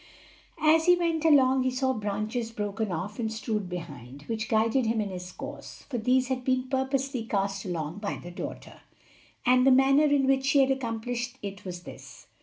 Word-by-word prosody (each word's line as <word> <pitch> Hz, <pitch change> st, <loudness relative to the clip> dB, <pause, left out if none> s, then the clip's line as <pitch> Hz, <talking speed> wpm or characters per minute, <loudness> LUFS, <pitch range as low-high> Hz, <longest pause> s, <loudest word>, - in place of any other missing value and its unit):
As 320 Hz, +2 st, +4 dB
he 355 Hz, -, +8 dB
went 335 Hz, -2 st, -1 dB
along 265 Hz, -4 st, +5 dB
he 255 Hz, -, +1 dB
saw 260 Hz, +1 st, 0 dB
branches 215 Hz, +2 st, -3 dB
broken 210 Hz, -1 st, -3 dB
off 200 Hz, +6 st, -4 dB
and 220 Hz, -2 st, -1 dB
strewed 215 Hz, -3 st, -3 dB
behind, 145 Hz, -6 st, -8 dB
which 220 Hz, +2 st, -4 dB
guided 225 Hz, +3 st, +2 dB
him 225 Hz, 0 st, +1 dB
in 205 Hz, -2 st, -2 dB
his 180 Hz, 0 st, -7 dB
course; -, -, -9 dB
for 245 Hz, -, -1 dB
these 255 Hz, +3 st, +2 dB
had 255 Hz, -1 st, -2 dB
been 255 Hz, 0 st, 0 dB
purposely 265 Hz, -1 st, -1 dB
cast 195 Hz, -2 st, -2 dB
along 170 Hz, 0 st, -4 dB
by 205 Hz, -1 st, -3 dB
the 175 Hz, -, -9 dB
daughter. 175 Hz, -, -8 dB, 0.6 s
And 250 Hz, 0 st, +5 dB
the 270 Hz, -, +6 dB
manner 270 Hz, +3 st, +5 dB
in 285 Hz, -2 st, +3 dB
which 270 Hz, 0 st, +2 dB
she 275 Hz, -, +3 dB
had 270 Hz, 0 st, +3 dB
accomplished 240 Hz, -1 st, -3 dB
it 200 Hz, 0 st, -7 dB
was 175 Hz, -1 st, -6 dB
this. -, -, -12 dB
235 Hz, 190 wpm, -28 LUFS, 205-265 Hz, 0.6 s, he